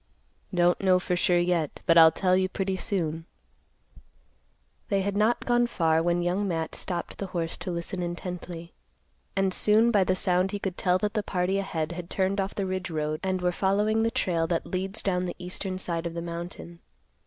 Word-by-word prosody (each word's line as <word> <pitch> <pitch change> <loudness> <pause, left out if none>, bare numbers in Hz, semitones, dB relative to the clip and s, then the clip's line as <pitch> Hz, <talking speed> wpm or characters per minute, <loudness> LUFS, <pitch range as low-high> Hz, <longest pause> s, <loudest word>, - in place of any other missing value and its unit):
"Don't 175 -1 +2
know 185 -2 +4
for 180 0 -1
sure 175 0 +3
yet, 175 -3 0
but 165 - +4
I'll 160 -1 +9
tell 185 +2 +2
you 185 0 +1
pretty 190 0 -2
soon." 165 -6 -2 1.6
They 195 -1 +2
had 200 +1 -2
not 215 +3 +2
gone 240 0 +3
far 165 -8 +2
when 175 +1 +1
Young 185 +4 0
Matt 165 -3 -2
stopped 175 -2 -4
the 195 - -3
horse 170 -3 -3
to - - -6
listen 175 +1 -4
intently; 175 -1 -6 0.6
and 195 -1 +1
soon 220 +4 +4
by 205 -4 +4
the 185 0 +1
sound 185 +1 +1
he 205 - -2
could 190 -3 -3
tell 180 -1 +2
that 210 +2 -2
the 215 - 0
party 190 0 0
ahead 165 -5 -2
had 170 0 -7
turned 195 +1 0
off 195 +1 -4
the 200 - -1
ridge 185 0 -3
road 155 -1 -2
and 185 -1 -1
were 180 - +2
following 205 +4 +1
the 225 - +2
trail 170 -6 0
that 170 -1 -1
leads 190 +3 -3
down 180 -2 0
the 175 - -4
eastern 185 +1 -4
side 170 -2 -3
of 170 - -7
the 170 - -3
mountain. 170 0 -7
180 Hz, 200 wpm, -27 LUFS, 170-195 Hz, 1.6 s, I'll